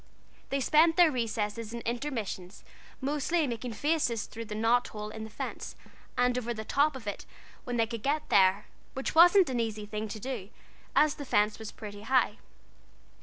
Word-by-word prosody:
They 275 Hz, -, 0 dB
spent 320 Hz, +5 st, +4 dB
their 345 Hz, -3 st, +7 dB
recesses 225 Hz, -2 st, -2 dB
and 235 Hz, -, -5 dB
intermissions 230 Hz, -7 st, -4 dB, 0.4 s
mostly 295 Hz, +4 st, 0 dB
in 270 Hz, -, -1 dB
making 235 Hz, +1 st, -4 dB
faces 245 Hz, -4 st, 0 dB
through 230 Hz, 0 st, -8 dB
the 210 Hz, -1 st, -6 dB
knot 230 Hz, +3 st, +2 dB
holes 210 Hz, 0 st, -7 dB
in 220 Hz, 0 st, -6 dB
the -, -, -9 dB
fence, 215 Hz, -, -6 dB, 0.4 s
and 245 Hz, 0 st, +3 dB
over 240 Hz, -1 st, -4 dB
the 220 Hz, 0 st, -6 dB
top 290 Hz, +4 st, +2 dB
of 255 Hz, -4 st, -8 dB
it 205 Hz, -, -5 dB, 0.4 s
when 245 Hz, -1 st, -2 dB
they 230 Hz, -, +3 dB
could 230 Hz, -1 st, -6 dB
get 290 Hz, +5 st, -1 dB
there, 190 Hz, +1 st, +4 dB, 0.3 s
which 265 Hz, -, -3 dB
wasn't 350 Hz, -1 st, +7 dB
an 245 Hz, -, -1 dB
easy 215 Hz, -2 st, -2 dB
thing 215 Hz, +1 st, -4 dB
to 215 Hz, +1 st, -6 dB
do, 210 Hz, -5 st, -5 dB, 0.5 s
as 300 Hz, -1 st, +5 dB
the 285 Hz, -, -7 dB
fence 210 Hz, -5 st, +1 dB
was 220 Hz, -1 st, -7 dB
pretty 205 Hz, -1 st, -9 dB
high. 235 Hz, -2 st, +2 dB
235 Hz, 185 wpm, -29 LUFS, 215-275 Hz, 0.5 s, their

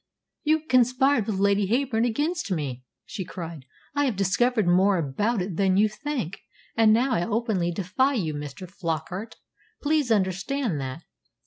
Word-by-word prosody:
"You 310 Hz, +1 st, +1 dB
conspired 255 Hz, -2 st, +3 dB
with 210 Hz, -3 st, -1 dB
Lady 200 Hz, 0 st, +2 dB
Heyburn 240 Hz, 0 st, +1 dB
against 300 Hz, +5 st, -1 dB
me!" 135 Hz, -7 st, -3 dB, 0.2 s
she 195 Hz, -, -5 dB
cried. 165 Hz, -5 st, -8 dB, 0.3 s
"I 285 Hz, 0 st, +2 dB
have 250 Hz, -6 st, 0 dB
discovered 210 Hz, +3 st, +2 dB
more 190 Hz, +2 st, +4 dB
about 185 Hz, -, 0 dB
it 180 Hz, -3 st, -5 dB
than 190 Hz, -1 st, +3 dB
you 210 Hz, +2 st, +5 dB
think; 235 Hz, -, -4 dB, 0.4 s
and 220 Hz, -1 st, +5 dB
I 245 Hz, -, +2 dB
now 175 Hz, -, -2 dB
openly 210 Hz, -6 st, 0 dB
defy 205 Hz, +10 st, +1 dB
you, 165 Hz, -9 st, -1 dB
Mr. 145 Hz, +5 st, -7 dB
Flockart. 180 Hz, +4 st, -4 dB, 0.4 s
Please 295 Hz, -4 st, +1 dB
understand 195 Hz, -, 0 dB
that." 135 Hz, +5 st, -6 dB
205 Hz, 150 wpm, -25 LUFS, 175-245 Hz, 0.4 s, you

